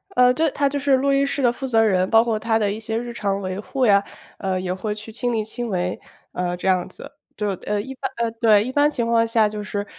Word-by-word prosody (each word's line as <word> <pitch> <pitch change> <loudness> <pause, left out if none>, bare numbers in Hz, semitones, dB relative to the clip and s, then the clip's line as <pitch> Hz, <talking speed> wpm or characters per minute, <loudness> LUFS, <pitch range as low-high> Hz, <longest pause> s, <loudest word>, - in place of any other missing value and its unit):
呃， 250 0 +5
对， 315 +4 +1
他 285 -1 +1
就 285 +1 -2
是 275 -1 +3
录 275 +2 +1
音 275 0 +3
室 280 - -2
的 245 -2 +4
负 265 +2 -5
责 225 -3 +3
人， 185 -3 +2
包 225 0 +6
括 225 -2 -1
他 225 0 +1
的 205 -2 0
一 215 - -5
些 225 0 -3
日 240 +1 -4
常 200 -4 -1
维 185 0 -4
护 260 +4 -1
呀， 200 -2 +5 0.4
呃， 190 -1 -1
也 185 0 -2
会 210 +3 -4
去 215 +1 -9
亲 245 +2 -2
力 220 -2 0
亲 240 +2 -5
为， 180 -2 -2 0.3
呃， 180 0 -2
这 185 - -4
样 185 -1 +2
子。 285 - -11 0.2
对， 205 -2 -1
呃， 210 0 0
一 265 +6 -6
般 260 - -4
呃， 230 -1 0
对， 215 -3 +5
一 255 - -4
般 290 +2 +3
情 240 -6 -2
况 230 0 +2
下 225 -1 +3
就 210 0 -5
是 205 -1 -4
225 Hz, 290 characters per minute, -22 LUFS, 205-250 Hz, 0.4 s, 包